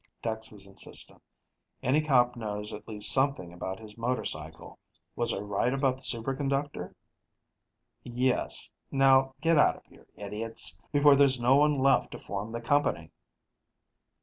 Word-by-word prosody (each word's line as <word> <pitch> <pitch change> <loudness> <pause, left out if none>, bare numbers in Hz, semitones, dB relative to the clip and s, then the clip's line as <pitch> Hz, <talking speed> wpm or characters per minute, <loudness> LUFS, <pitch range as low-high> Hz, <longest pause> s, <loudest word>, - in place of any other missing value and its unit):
Dex 110 -1 -4
was 100 -2 -10
insistent: 95 0 -5 0.6
"Any 135 +5 +2
cop 125 -5 +3
knows 105 -2 -5
at 105 - -9
least 105 -2 +4
something 135 -11 0
about 95 +2 -6
his 110 0 -11
motorcycle. 80 -10 -4 0.4
Was 120 - 0
I - - -2
right 105 +4 -1
about 135 -1 0
the - - -20
superconductor?" 135 +4 -2 1.1
"Yes. 125 +1 -1 0.2
Now, 135 -1 +3
get 165 -2 +3
out - - +4
of - - -18
here, - - -21
idiots, 105 +3 -1 0.2
before 145 -1 +6
there's 135 -2 +4
no 125 +3 +4
one 150 0 +3
left 135 +1 +3
to - - -6
form 100 +3 -6
the 115 0 -5
company!" 115 - 0
120 Hz, 145 wpm, -28 LUFS, 105-135 Hz, 1.1 s, before